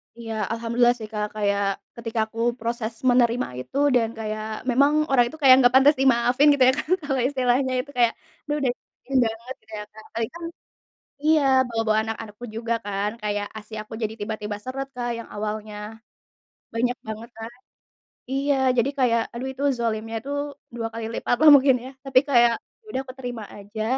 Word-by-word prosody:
Iya, 230 -1 -6 0.2
alhamdulillah, 235 +1 +2
sih, 215 - -7
Kak. 210 0 -1
Kayak, 200 -1 +1 0.3
ketika 230 -1 -4
aku 225 +1 -10 0.2
proses 230 0 -3 0.2
menerima 245 0 +3
itu, 130 - -6 0.2
dan 230 -2 +3
kayak, 215 0 -4 0.2
memang, 280 +4 +4 0.2
orang 245 -3 +5
itu 315 - -9
kayak 265 -2 +9
nggak 245 -1 +5
pantas 280 +3 +7
dimaafin, 255 +2 +4
gitu, 270 -2 +3
ya, - - +3
kan? 305 - -5
Kalau 270 -3 0
istilahnya 260 -1 +1
itu 285 - -14
kayak, 235 -1 +4 0.3
dia 295 - 0
udah 270 - +1
nyakitin 270 +1 -5
banget, 230 +3 -6
gitu, 220 0 -22
ya, - - -5
Kak. 220 +1 -13
Apalagi 225 -1 -3
kan 340 - -8 0.8
iya, 310 0 +5 0.3
bawa-bawa 225 -2 +1
anak-anakku 225 +1 -6
juga, 230 +1 -1
kan. 205 0 -1
Kayak, 205 -1 -1
ASI 215 +1 -11
aku 215 - -11
jadi 220 0 -1
tiba-tiba 210 0 -4
seret, 270 +3 -5
Kak, 240 -1 -3
yang 230 - -8
awalnya 210 0 -4 1.0
banyak 245 +2 0
banget, 220 +2 -6
kan. 225 +1 -6 0.8
Iya, 280 +1 +1 0.2
jadi 240 +3 +3
kayak, 235 -3 +3
aduh, 245 +3 -4
itu, 270 +2 -5 0.2
zolimnya 225 -1 -2
itu 280 +4 -7 0.4
dua 230 -1 -2
kali 230 0 -4
lipat, - - 0
lah, 310 - +9
mungkin 270 -1 +5
ya. 260 - -8
Tapi 265 -1 +5
kayak, 240 -2 +5 0.3
ya - - -34
udah 265 - -1
aku 255 - -8
terima 245 -3 -5
aja. 205 +2 -6
235 Hz, 180 wpm, -24 LUFS, 220-260 Hz, 1.0 s, kayak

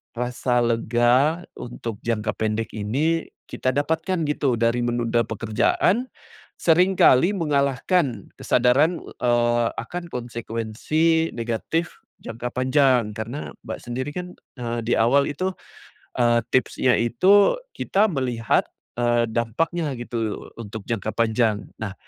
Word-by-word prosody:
rasa 125 0 0
lega 120 +7 +2
untuk 115 -3 -6
jangka 115 -2 0
pendek 110 +1 -2
ini 140 +11 -1 0.2
kita 130 - -1
dapatkan 160 +4 0
gitu, 140 -4 +1
dari 115 +1 +1
menunda 120 -1 0
pekerjaan, 115 - +1 0.5
seringkali 175 -1 +4
mengalahkan 140 - 0
kesadaran, 150 +8 +3
eee, 120 -1 +1
akan 175 0 -5
konsekuensi 120 +8 -1
negatif 120 +9 -3 0.2
jangka 115 +2 -5
panjang? 130 -3 +3
Karena, 115 +7 -6 0.2
Mbak - - -5
sendiri 130 +4 -4
kan, 180 0 -5 0.3
eee, 120 -1 -3
di 120 - +2
awal 135 +5 +3
itu, 185 +6 -2 0.7
eee, 120 -1 +4
tipsnya 130 0 +2
itu 185 - +4 0.2
kita 200 +2 +1
melihat, 125 -5 0 0.3
eee, 120 0 +2
dampaknya 145 +8 -1
gitu 115 -3 -4
untuk 110 -1 -7
jangka 110 -2 -2
panjang. 110 -2 +1 0.2
Nah, 100 -3 -4
120 Hz, 110 wpm, -23 LUFS, 115-150 Hz, 0.7 s, seringkali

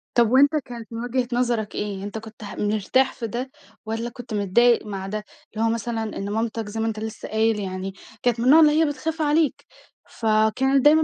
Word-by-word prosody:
طب، 235 -1 +4
وأنتَ 285 +4 +5
كانت 235 -2 -9
من 230 +1 -4
وجهة 245 0 -1
نظرك 240 -3 0
إيه؟ 200 -2 -3
أنتَ 205 +2 -5
كنت 220 0 -10
ه 205 - -7
مرتاح 215 +6 +1
في 230 - -5
ده 250 +4 -4 0.3
والّا 225 +2 -3
كنت 240 -1 -9
متضايق 215 +4 +3
مع 195 -2 -5
ده؟ 210 +1 -4 0.3
اللي 225 +1 0
هو - - +3
مثلًا 230 0 -2
إن 200 +1 -4
مامتك- 225 0 -2
زي 225 +2 -5
ما 225 - 0
أنتَ 215 -1 -3
لسه 220 0 -6
قايل 220 0 +1
يعني- 190 0 -4 0.3
كانت 240 -2 +2
من 240 - -1
النوع 300 +5 +8
اللي 305 -2 +7
هي - - +5
بتخاف 315 +2 -3
عليك. 300 0 +1 0.4
فكانت 225 +5 +2
دايمًا 315 +1 +7
225 Hz, 205 wpm, -23 LUFS, 215-255 Hz, 0.4 s, النوع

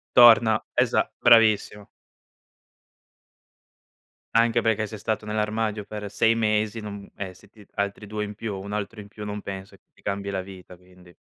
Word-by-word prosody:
Torna. 115 -2 +7
Esa - - +2
bravissimo. 110 -3 +4 2.5
Anche 115 +1 +3
perché 110 -1 +1
se 110 - -8
è - - -7
stato 110 0 -2
nell'armadio 105 0 -1
per 105 -1 -7
6 115 0 +3
mesi, 110 0 0
non 100 -1 -8
e 95 -2 -6
sì 90 - -19
ti 105 -2 -18
altri 100 +1 -2
2 105 +1 -3
in 105 0 -8
più 110 -1 -4
o - - -6
1 100 +2 -7
altro 105 +1 -4
in 100 - -9
più, 105 +1 -10
non 105 0 -5
penso 95 -1 -8
che - - -49
ti - - -25
cambi 100 0 -3
la 95 -1 -2
vita, 90 -1 -12
quindi. 90 -1 -20
105 Hz, 175 wpm, -25 LUFS, 100-110 Hz, 2.5 s, Torna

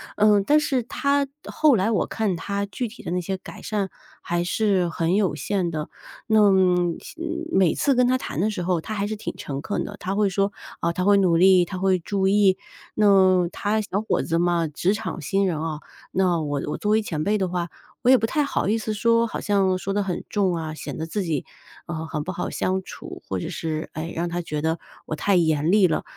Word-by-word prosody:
呃， 210 -1 +5
但 295 +10 +4
是 270 -4 0
他 280 +3 0 0.2
后 305 -4 +3
来 210 +2 +1
我 205 - +1
看 215 -5 -1
他 200 +4 -3
具 240 +4 -4
体 230 +3 -12
的 - - -4
那 180 - 0
些 190 +2 -3
改 - - -11
善 205 -3 -2 0.3
还 175 0 -1
是 190 -1 +1
很 165 +1 0
有 200 -4 +1
限 190 -4 -1
的， 155 -2 -4 0.4
那 220 -1 +4 0.6
像 - - -12 0.3
每 185 -4 +3
次 280 - +2
跟 250 0 +3
他 255 +1 +3
谈 160 - -5
的 210 +5 +2
时 185 -4 -3
候， 180 -1 +1
他 215 - -5
还 200 -1 -1
是 215 +1 -3
挺 210 - -6
诚 140 -1 -5
恳 205 - -2
的， 205 - -7
他 190 +2 -3
会 210 -1 +2
说， 195 +2 0 0.3
啊， 170 - 0
他 180 - -1
会 200 +1 +5
努 185 -4 +3
力， 185 0 +6
他 185 +1 -6
会 190 -1 +2
注 190 +2 -1
意。 195 -1 +4 0.4
那 190 -4 +5
他 215 +3 -1
小 200 0 -2
伙 220 - 0
子 165 0 0
嘛， 170 -1 +2
职 175 +6 0
场 210 -5 -4
新 195 +6 +1
人 165 -5 -1
啊， 160 -2 -3 0.3
那 180 -3 +2
我 145 -2 -2
我 - - -2
作 210 - -1
为 220 +1 +4
前 160 -7 -3
辈 210 +4 +2
的 190 - 0
话， 175 -1 -2 0.3
我 250 - +4
也 260 - +8
不 225 - 0
太 300 +4 +1
好 280 - -1
意 220 +3 +2
思 220 -1 -3
说， 230 +2 +3
好 - - -5
像 195 -3 +2
说 195 +1 -3
得 205 - +1
很 185 -3 -3
重 190 -4 +1
啊， 160 -1 -4
显 155 - -7
得 160 - -3
自 200 +5 -2
己， 160 -6 -2 0.4
呃， 160 -1 -4
很 155 -2 -3
不 185 - -4
好 180 - -3
相 190 +1 -1
处， - - -9
或 95 - -2
者 - - -4
是， 155 -1 -4
哎， 160 +2 -5
让 170 +1 -1
他 175 +1 -2
觉 150 -3 -4
得 160 +1 0 0.3
我 155 - -3
太 200 +5 +1
严 160 -1 +2
厉 200 -3 +5
了。 160 - -1
190 Hz, 250 characters per minute, -24 LUFS, 170-210 Hz, 0.6 s, 也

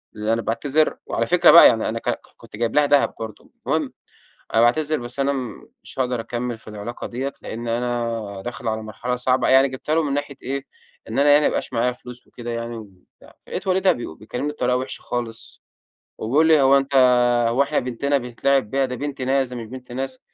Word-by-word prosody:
اللي 105 +1 -1
أنا 115 - 0
باعتذر." 145 +8 0
وعلى - - -1
فكرة - - +6
بقى - - +10
يعني - - +1
أنا - - -3
ك - - -3
ك - - -1 0.2
كنت - - -13
جايب 115 +1 -1
لها 150 0 +5
دهب 145 0 +3
برضو، 110 -2 -8 0.2
المهم - - 0 0.6
"أنا 115 - +5
باعتذر 155 +6 +2
بس 120 +3 -6
أنا 140 +1 +2 0.5
مش - - -13
هاقدر 125 -2 0
أكمل 120 +1 -4
في - - -15
العلاقة 105 +3 -6
ديَّة، 130 +3 -4
لأن 115 +1 -6
أنا 115 -4 -2
داخل 120 -1 -5
على 110 0 -2
مرحلة 110 +4 -4
صعبة." 125 +1 +1
يعني 135 +1 +6
جبتها 130 +4 -3
له 165 - +3
من 140 -3 -1
ناحية 145 -1 -3
إيه، 135 +1 -3 0.4
إن - - -3
أنا 145 +1 +5
يعني 145 +1 +6
ما - - +5
بقاش - - -3
معايا 125 +1 +1
فلوس 125 0 -12
وكده 120 -1 -8
يعني 115 0 -4
وبتاع، 100 -5 -15
لقيت - - -5
والدها 190 0 +3
بي 120 - -6
بيكلّمني 125 - -4
بطريقة 125 -3 0
وحشة 130 +1 -5
خالص، 120 -2 -5 0.6
وبيقول 145 +9 +2
لي: 155 -3 +5
"هو 135 +1 +6
أنت 140 0 -2 0.5
هو 130 +4 +3
إحنا 140 - 0
بنتنا 130 +3 -1
بيتلعب 125 -1 0
بيها، 135 +2 +1
دي 125 - -5
بنت 140 +1 -5
ناس 130 0 +1
ده 125 - -7
مش 115 -2 -6
بنت 125 +1 -10
ناس." 130 +1 -4
125 Hz, 210 wpm, -22 LUFS, 115-140 Hz, 0.6 s, بقى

